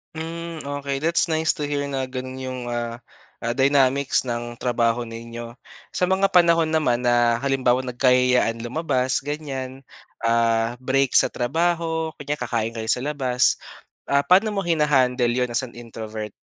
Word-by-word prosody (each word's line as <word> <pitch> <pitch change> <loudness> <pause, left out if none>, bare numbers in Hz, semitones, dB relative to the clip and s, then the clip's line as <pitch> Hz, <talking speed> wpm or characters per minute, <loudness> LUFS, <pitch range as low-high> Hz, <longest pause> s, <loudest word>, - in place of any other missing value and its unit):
Hmm, 165 0 -6
okay 140 -1 -4
that's 165 +2 +3
nice 160 +1 +1
to 150 - -2
hear 145 -1 -2
na 135 -1 -2
ganun 130 0 -6
yung 130 -1 -5
ah, 120 0 -4 0.4
ah 115 - -2
dynamics 135 0 +3
ng 120 -1 -4
trabaho 120 -1 +1
ninyo. 115 +1 -8 0.3
Sa 180 - 0
mga 190 +2 +2
panahon 170 -3 +4
naman 150 -7 +1
na 120 -1 +2
halimbawang 130 -2 +1
nagkayayaan 125 -2 +2
lumabas 130 0 -1
ganyan, 135 -3 -5 0.4
ah, 115 0 +1
break 135 +1 +2
sa - - +3
trabaho 160 +4 -1
kunya 145 +1 -3
kakain 115 -3 -2
kayo 110 - -4
sa 115 +2 +1
labas, 130 -3 +1 0.5
ah, 140 0 +2
paano 195 +7 +3
mo 200 - -1
hinahandle 135 -8 +2
'yon 125 0 0
as 120 +3 -1
an 120 - -13
introvert? 110 -2 -7
130 Hz, 150 wpm, -23 LUFS, 120-150 Hz, 0.5 s, panahon